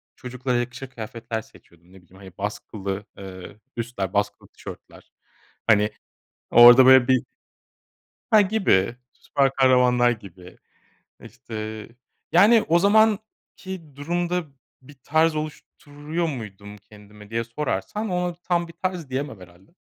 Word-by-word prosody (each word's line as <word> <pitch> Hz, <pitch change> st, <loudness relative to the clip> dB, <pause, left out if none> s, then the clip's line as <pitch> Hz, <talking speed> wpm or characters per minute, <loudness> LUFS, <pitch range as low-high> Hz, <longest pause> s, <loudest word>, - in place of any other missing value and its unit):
çocuklara 125 Hz, -1 st, -3 dB
yakışır 125 Hz, +2 st, -4 dB
kıyafetler 115 Hz, -1 st, -6 dB
seçiyordum. 85 Hz, -3 st, -22 dB
Ne 95 Hz, -, -16 dB
bileyim, 90 Hz, +1 st, -23 dB
hani, 95 Hz, -2 st, -12 dB
baskılı, 100 Hz, -1 st, -5 dB
ııı, 95 Hz, +1 st, -10 dB, 0.2 s
üstler, 110 Hz, -5 st, -4 dB
baskılı 100 Hz, 0 st, -2 dB
tişörtler. -, -, -13 dB, 0.6 s
Hani, 105 Hz, -1 st, +4 dB, 0.6 s
orada 120 Hz, +2 st, +9 dB
böyle 130 Hz, -1 st, +7 dB
bir 130 Hz, -1 st, +3 dB, 1.1 s
Ha, 215 Hz, -1 st, +7 dB
gibi, 185 Hz, -, +1 dB, 0.2 s
süper 135 Hz, -1 st, 0 dB
kahramanlar 125 Hz, -2 st, +4 dB
gibi. 95 Hz, -5 st, -10 dB, 0.7 s
İşte, 110 Hz, -3 st, -8 dB, 0.4 s
yani, 210 Hz, +6 st, +5 dB
o 170 Hz, +2 st, +4 dB
zamanki 200 Hz, -6 st, 0 dB
durumda 175 Hz, +4 st, -2 dB, 0.4 s
bir 140 Hz, +2 st, -16 dB
tarz 160 Hz, +1 st, +2 dB
oluşturuyor 155 Hz, +1 st, -5 dB
muydum 105 Hz, -6 st, -8 dB
kendime 105 Hz, 0 st, -16 dB
diye 115 Hz, +1 st, -2 dB
sorarsan, 145 Hz, -, -4 dB
ona 180 Hz, -1 st, -2 dB
tam 175 Hz, -1 st, -1 dB
bir 170 Hz, -, -13 dB
tarz 180 Hz, -6 st, -4 dB
diyemem 130 Hz, -5 st, -4 dB
herhâlde. 85 Hz, -, -17 dB
125 Hz, 120 wpm, -23 LUFS, 105-165 Hz, 1.1 s, orada